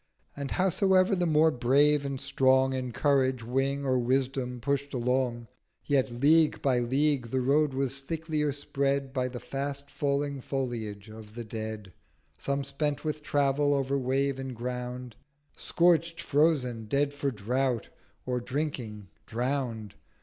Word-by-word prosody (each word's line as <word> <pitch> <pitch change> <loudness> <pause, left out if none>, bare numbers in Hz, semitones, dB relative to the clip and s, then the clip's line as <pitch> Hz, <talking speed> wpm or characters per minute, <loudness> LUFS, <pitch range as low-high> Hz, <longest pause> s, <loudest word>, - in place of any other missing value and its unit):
And 140 -1 -4
howsoever 190 +1 +3
the 175 -1 0
more 160 0 +4
Brave 140 +3 +3
and 135 -1 -4
Strong 130 -1 +3
In 130 -1 -3
Courage, 130 -2 +1
Wing, 135 +4 -1
or 130 -1 +2
Wisdom 125 0 -1
push'd 140 +2 -2
along, 125 -1 0 0.4
Yet 135 -3 +2
League 155 +3 +4
by 130 -3 +2
League 135 +1 +1
the 130 +3 -1
Road 140 +2 +2
was 135 0 -1
thicklier 155 0 -2
spread 140 -1 -1
By 130 -2 0
the 125 -1 -6
fast 140 +1 -5
falling 140 -1 -1
Foliage 115 -7 -4
of 110 0 -12
the 120 - -5
Dead: 110 -3 -6 0.5
Some 140 0 -1
spent 145 +2 -2
with 155 0 -2
Travel 145 0 +2
over 135 0 0
Wave 135 +1 0
and 130 -2 -5
Ground; 125 0 -5 0.4
Scorcht, 170 -1 +2
frozen, 140 -8 +1
dead 140 +5 +1
for 145 -1 -1
Drought, 125 +2 -1 0.4
or 125 -1 -1
drinking 120 -6 -4 0.2
drown'd. 120 -3 -2
135 Hz, 140 wpm, -28 LUFS, 125-145 Hz, 0.5 s, more